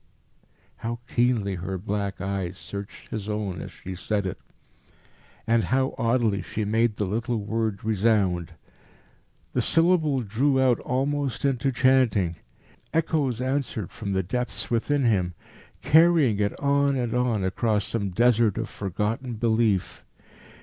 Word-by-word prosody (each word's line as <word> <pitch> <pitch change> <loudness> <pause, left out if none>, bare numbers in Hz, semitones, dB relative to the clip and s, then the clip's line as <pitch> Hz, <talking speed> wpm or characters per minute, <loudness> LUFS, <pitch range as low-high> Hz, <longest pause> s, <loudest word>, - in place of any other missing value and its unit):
How 120 +1 -4
keenly 120 -6 +1
her 95 +1 -4
black 100 +1 -3
eyes 95 -2 -3
searched 100 0 -8
his 110 -1 -5
own 105 -5 -3
as - - -7
she 95 - -8
said 100 +3 -2
it, 95 - -4 1.1
and 115 0 +2
how 130 +1 +1
oddly 115 -4 +1
she 105 +3 -3
made 110 +1 +1
the 105 - -1
little 115 +5 -1
word 110 -1 -2
resound. 100 -5 +1 1.0
The - - +1
syllable 165 -5 +3
drew 130 +6 +1
out 130 -3 +3
almost 135 -1 -1
into 135 -1 +1
chanting. 120 -10 +2 0.5
Echoes 150 -7 0
answered 130 -6 -2
from 105 -4 -4
the 95 0 +1
depths 125 +8 -2
within 135 +5 +1
him, 90 -6 +1 0.5
carrying 160 -9 +5
it 100 0 -1
on 140 0 +2
and 120 -3 -1
on 125 -5 +1
across 105 +2 0
some 100 -4 -2
desert 115 +1 +3
of 115 -1 -3
forgotten 105 +6 -3
belief. 110 -4 +1
115 Hz, 135 wpm, -25 LUFS, 100-130 Hz, 1.1 s, carrying